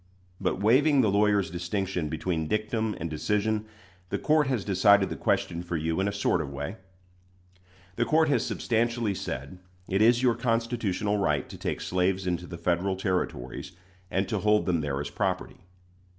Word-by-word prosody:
But - - -1
waiving 135 +7 +4
the 110 -5 +2
lawyer's 100 -2 +2
distinction 90 -1 -2
between 80 +1 -2
dictum 110 +2 -1
and 85 - -3
decision, 105 +7 0 0.4
the - - -1
court 155 -2 +2
has 125 -7 -1
decided 100 0 +4
the - - -2
question 85 -1 0
for 85 -1 -3
you 80 +2 -1
in 95 - +1
a - - 0
sort 100 -4 +1
of 70 - -5
way. 70 +9 -5 1.2
The - - +2
court 160 0 +3
has 125 -5 +2
substantially 115 -3 0
said, 70 0 -6 0.3
it 95 +2 +1
is 120 +3 +5
your 125 -2 +4
constitutional 115 -4 0
right 75 -8 0
to - - -8
take - - -3
slaves 90 +1 0
into 90 -1 -2
the 85 - -7
Federal 90 +3 0
Territories, 90 - -3 0.4
and 95 +1 0
to 110 -3 -1
hold 105 +1 +3
them 85 -4 +1
there 70 -2 -2
as 70 0 -4
property. 95 -2 -2
100 Hz, 170 wpm, -27 LUFS, 85-110 Hz, 1.2 s, is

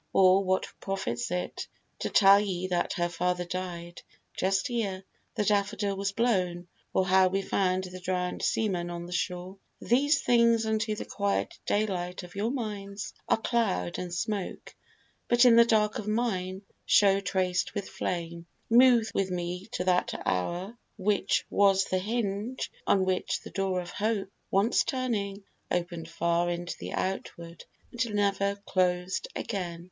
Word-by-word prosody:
Or 190 +1 +5
what 185 0 +1
profits 120 - -3
it 180 0 -3 0.3
To - - -2
tell 200 -1 +7
ye 185 -3 -2
that 175 -1 0
her 175 0 0
father 180 +1 -1
died, 175 -1 -5 0.3
just 195 +7 0
ere 200 -5 -2 0.3
The 210 - 0
daffodil 205 0 +1
was 195 0 -1
blown; 185 -6 0 0.2
or 190 - +2
how 190 0 +5
we 195 +1 -1
found 185 -1 +1
The 185 0 -8
drowned 180 0 -2
seaman 180 -6 0
on 170 0 -5
the 175 - -10
shore? 180 +1 -3 0.2
These 275 +4 +2
things 235 -2 +4
Unto 220 0 0
the - - -6
quiet 200 -1 -2
daylight 185 -4 -1
of 180 - -11
your 205 +3 -1
minds 210 -5 -5 0.2
Are - - +4
cloud 155 - 0
and 180 -1 -5
smoke, 195 +2 -3 0.5
but 240 +1 +5
in 240 -2 +8
the 235 0 +8
dark 215 -2 +2
of 210 - -6
mine 200 -4 -1 0.2
Show 200 -1 +5
traced 185 -1 -1
with 200 - -3
flame. 170 -1 -4 0.2
Move 240 -2 +6
with 195 -1 0
me 180 +1 -4
to - - -1
that 180 -1 +1
hour, 175 - -1 0.2
Which 200 0 +1
was 195 -1 +4
the 185 - 0
hinge 215 +3 -2 0.2
on 195 -2 +3
which 185 -1 -1
the - - -10
door 190 -2 0
of 175 - -6
Hope, 205 -2 -1 0.2
Once 200 +5 +3
turning, 210 -6 -2 0.3
open'd 170 -2 -2
far 170 +1 +1
into 175 0 -3
the - - -6
outward, 170 -3 -4 0.3
And 230 -3 -2
never 200 -1 +1
closed 180 - 0
again. 180 -5 -3
195 Hz, 155 wpm, -28 LUFS, 180-210 Hz, 0.5 s, in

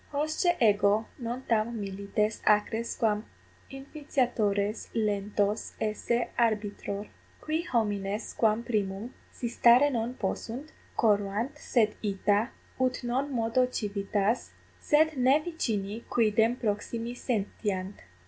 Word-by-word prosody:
Hosce 310 +4 +1
ego 210 -1 +4
non 240 +2 -4
tam 230 0 0
milites 200 +2 -2
acres 215 +2 +2
quam 215 -2 +1 0.5
infitiatores 245 -7 -1
lentos 205 -1 0
esse 225 +2 -1
arbitror. 210 -2 0 0.3
Qui 315 +3 -2
homines 205 -3 -1
quam 220 0 +2
primum, 210 0 -2 0.2
si 240 - -4
stare 240 +4 +5
non 240 0 -2
possunt, 245 +7 -4 0.3
corruant, 210 +5 +1
sed 230 -7 +1
ita, 205 +2 +1 0.3
ut 255 0 0
non 260 +4 -1
modo 240 +1 +2
civitas, 205 -1 -1 0.3
sed 310 +1 +3
ne 260 +4 +5
vicini 230 - -3
quidem 225 +1 +3
proximi 230 +1 -2
sentiant. 205 -5 -2
225 Hz, 105 wpm, -29 LUFS, 205-250 Hz, 0.5 s, stare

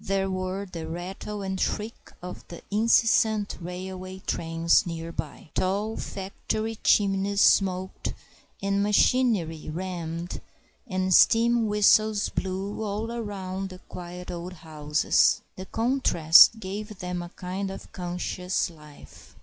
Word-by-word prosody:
There 195 0 0
were 185 +1 -3
the 170 -4 -7
rattle 190 +4 -6
and 190 0 -3
shriek 215 +2 -3
of 180 - -7
the 170 - -10
incessant 220 -1 +3
railway 185 +1 -6
trains 165 +1 +2
near 165 0 -5
by. 160 - -7
Tall 205 +4 0
factory 215 +3 -4
chimneys 200 0 +3
smoked 190 -1 +2 0.5
and 200 0 +1
machinery 205 -6 +2
hummed 170 0 -5 0.5
and 185 -2 0
steam 230 +3 +5
whistles 210 0 +4
blew 195 +3 -3
all 215 +2 -3
around 195 -4 -4
the 185 - -10
quiet 180 0 -9
old 175 +1 -6
houses. 155 -2 +1
The 185 +1 -8
contrast 225 - +5
gave 210 +1 -6
them 180 -1 -4
a 175 - -7
kind 185 +3 -5
of 195 - -9
conscious 180 0 -2
life. 150 -2 -16
190 Hz, 120 wpm, -26 LUFS, 175-205 Hz, 0.5 s, steam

